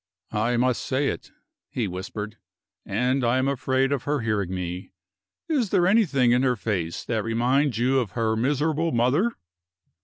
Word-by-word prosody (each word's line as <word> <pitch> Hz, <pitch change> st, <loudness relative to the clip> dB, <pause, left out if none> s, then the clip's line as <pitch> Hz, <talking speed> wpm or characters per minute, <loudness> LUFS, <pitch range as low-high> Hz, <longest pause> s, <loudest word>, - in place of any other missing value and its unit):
"I 115 Hz, +3 st, +1 dB
must 125 Hz, -3 st, +1 dB
say 135 Hz, +2 st, 0 dB
it," -, -, -6 dB, 0.4 s
he 115 Hz, -4 st, -2 dB
whispered, 105 Hz, +4 st, -6 dB, 0.5 s
"and 125 Hz, +6 st, +1 dB
I 120 Hz, +2 st, +2 dB
am 130 Hz, +1 st, +1 dB
afraid 135 Hz, 0 st, +1 dB
of 140 Hz, -3 st, -1 dB
her 145 Hz, -1 st, 0 dB
hearing 105 Hz, -5 st, -1 dB
me. 90 Hz, 0 st, -5 dB, 0.5 s
Is 275 Hz, -, +1 dB
there 175 Hz, -, +3 dB
anything 165 Hz, -, +3 dB
in 125 Hz, +1 st, +4 dB
her 130 Hz, -2 st, +2 dB
face 95 Hz, -7 st, -3 dB
that 110 Hz, -3 st, -1 dB
reminds 120 Hz, +3 st, +1 dB
you 130 Hz, +3 st, +2 dB
of 110 Hz, -7 st, -3 dB
her 110 Hz, -2 st, 0 dB
miserable 150 Hz, +7 st, +1 dB
mother?" 135 Hz, -, +2 dB
125 Hz, 160 wpm, -25 LUFS, 110-140 Hz, 0.5 s, in